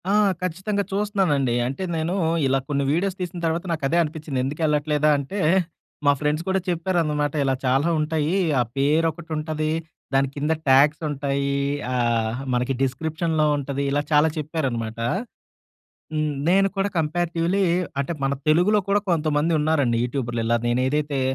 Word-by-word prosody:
ఆ! - - +2 0.3
ఖచ్చితంగా 190 +4 -1
చూస్తున్నానండి. 190 - +1
అంటే 135 +8 -4
నేను 160 +2 -1 0.3
ఇలా 135 +1 +2
కొన్ని 140 -1 0
వీడియోస్ 185 +4 0
తీసిన 175 -1 -4
తర్వాత 165 +2 -1
నాకదే 160 0 0
అనిపించింది. 155 -3 -4
ఎందుకెళ్ళట్లేదా 150 0 +1
అంటే 140 +9 -4 0.7
మా 145 - +7
ఫ్రెండ్స్ 150 +2 0
కూడా 190 0 +2
చెప్పారన్నమాట. 165 -4 0
ఇలా 135 -1 +1
చాలా 135 +6 +2
ఉంటాయి. 155 +3 0 0.2
ఆ - - +4 0.2
పేరొకటి 160 +4 +1
ఉంటది. 155 0 -2 0.4
దాని 135 0 +3
కింద 150 +2 -1 0.2
ట్యాగ్స్ 145 +4 +5
ఉంటాయి. 140 -1 -1 0.4
ఆహ్, 120 -1 0
మనకి 125 +2 0
డిస్‌క్రిప్షన్‌లో 155 +4 0
ఉంటది. 140 0 -3
ఇలా 145 +1 +1
చాలా 150 +1 +5
చెప్పారన్నమాట. 130 -8 -3 1.1
హ్మ్. 155 -1 0 0.2
నేను 195 +2 +4
కూడా 195 +1 +1
కంపేరేటివ్‌లీ 170 +4 0 0.4
అంటే 140 +4 -2
మన 135 - +1 0.2
తెలుగులో 180 +7 +4
కూడా 205 +1 +3
కొంతమంది 155 -1 +1
ఉన్నారండి. 145 -6 +2
యూట్యూబర్లు 120 -2 -2
ఇలా 120 +1 +2
నేను 120 +2 +1
ఏదైతే 145 -1 -1
150 Hz, 140 wpm, -23 LUFS, 140-170 Hz, 1.1 s, మా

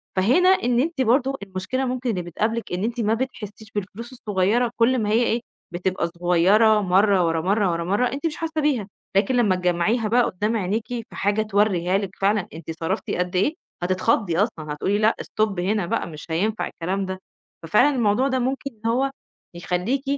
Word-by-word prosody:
فهنا 255 - +4
إن 245 -10 +3
أنتِ 295 +1 0
برضه 260 +3 +2
المشكلة 200 +8 -3
ممكن 255 0 -2
اللي 190 -6 -1
بتقابلِك 215 +7 -2
إن 180 +2 -2
أنتِ 235 +2 -2
ما 215 0 +2
بتحسّيش 220 -3 -5
بالفلوس 210 +4 -5
الصغيّرة 220 +1 0
كل 245 +2 +3
ما 210 -2 -1
هي 225 +3 +3
إيه، 235 0 0 0.3
بتبقى 180 0 -1
صغيّرة 180 +6 +3
مرّة، 190 0 +3
ورا 165 -1 0
مرّة، 195 +2 +1
ورا 170 0 -2
مرّة، 200 +8 +1
أنتِ 280 +4 -5
مش 310 - -5
حاسّة 320 -1 -2
بيها، 265 -9 0 0.3
لكن 235 +6 +2
لمّا 215 -6 +3
تجمّعيها 180 +6 +1
بقى 240 +3 +3
قدّام 210 +3 -1
عينيكِ 210 +3 -2
في 240 -2 -5
حاجة 205 +2 +1
تورّيها 200 -4 +1
لِك 195 -1 -5
فعلًا 200 -1 +1
أنتِ 165 0 -7
صرفتِ 165 - -2
قد 180 +1 -2
إيه، 200 +12 +2 0.3
هتتخضي 185 0 +1
أصلًا، 160 -7 -1
هتقولي 195 +7 0
لأ، 215 +1 +3
stop 215 -4 -1
هنا 195 +1 0
بقى - - -2
مش 155 -2 -10
هينفع 210 +7 0
الكلام 190 +3 -3
ده. 185 0 -5 0.4
ففعلًا 245 - +3
الموضوع 235 +2 +2
ده 260 -1 0
ممكن 270 +3 -2
إن 230 - +3
هو 270 +3 +1 0.4
يخلّيكِ 180 +10 -1
210 Hz, 185 wpm, -23 LUFS, 185-240 Hz, 0.4 s, فهنا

